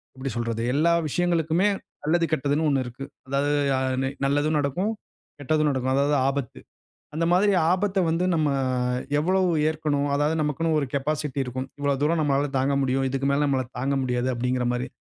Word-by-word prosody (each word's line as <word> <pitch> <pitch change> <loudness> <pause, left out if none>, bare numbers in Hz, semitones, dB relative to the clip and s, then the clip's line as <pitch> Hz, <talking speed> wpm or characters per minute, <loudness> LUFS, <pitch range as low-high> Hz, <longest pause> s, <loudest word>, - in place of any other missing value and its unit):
எப்படி 135 +1 -4
சொல்றது? 115 -1 -2
எல்லா 155 +4 +3 0.2
விஷயங்களுக்குமே 170 +3 +1 0.4
நல்லது, 165 +3 +2
கெட்டதுன்னு 145 +2 +1
1 135 -2 +1
இருக்கு. 125 +3 -8 0.2
அதாவது 140 +2 0 0.2
யா 130 - +1 0.2
நி 135 - 0 0.2
நல்லதும் 145 +2 +1
நடக்கும், 160 +9 -1 0.5
கெட்டதும் 155 +2 +1
நடக்கும். 130 -1 -1
அதாவது 140 +2 +2
ஆபத்து. 135 -3 -3 0.6
அந்த 165 +2 0
மாதிரி 200 +3 +4 0.2
ஆபத்த 195 +2 +1
வந்து 165 +2 0
நம்ம 155 -2 +2 0.7
எவ்வளவு 185 +3 +2 0.2
ஏற்கணும்? 150 -2 -1
அதாவது 145 +2 +1
நமக்குன்னு 155 +2 0
ஒரு 145 - 0
கேபாசிட்டி 145 0 -2
இருக்கும். 130 +1 -5
இவ்வளவு 140 -1 0
தூரம் 160 +2 +2
நம்மால 140 -1 +1
தாங்க 135 +2 +1
முடியும், 135 0 0
இதுக்கு 135 +1 -1
மேல 145 +1 +2
நம்மலா 135 -2 0
தாங்க 135 +2 0
முடியாது, 125 0 -1
அப்படிங்கிற 125 +1 -1
மாதிரி. 125 +1 -3
145 Hz, 165 wpm, -25 LUFS, 135-155 Hz, 0.7 s, மாதிரி